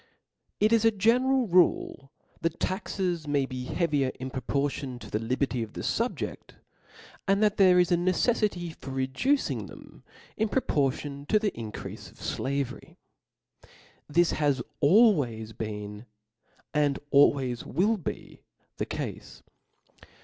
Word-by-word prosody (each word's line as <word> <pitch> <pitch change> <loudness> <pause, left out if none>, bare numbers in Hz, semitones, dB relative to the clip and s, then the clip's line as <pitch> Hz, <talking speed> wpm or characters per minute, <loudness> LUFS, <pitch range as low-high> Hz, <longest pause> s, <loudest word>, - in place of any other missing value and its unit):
TT 215 +2 +3
is 230 -1 +4
a 225 - +6
general 245 +5 +2
rukj 175 -6 +2 0.3
that 165 -1 -2
taxes 185 -4 -2
may 145 -2 +1
be 130 -1 -6
heavier 145 -4 0
in 130 0 -5
proportion 135 0 -2
to - - -11
the 105 - 0
liberty 125 +2 -1
of 110 -1 -6
the - - -6
fubjecl, 235 +2 -3 0.7
and 195 +2 +3
that 210 -1 +2
there 185 -2 +6
is 180 -1 +3
a - - +6
ncceffity 185 -1 0
for - - -9
reducing 135 - 0
them - - -14 0.3
in 220 0 +1
pro 265 - +1
portion 140 0 -1
to 215 - +4
the 210 -1 0
increale 110 -7 -8
of - - -22
flavery. 140 -1 -3 1.1
This 170 +3 +3
has 145 -4 +1 0.2
al 210 +10 +7
ways 115 - -3
been 105 0 -6 0.7
and 145 -2 +2
always 135 -4 +4
will 215 +5 +1
be 175 - -7 0.4
the - - -2
cale. - - -4
150 Hz, 135 wpm, -28 LUFS, 130-195 Hz, 1.1 s, al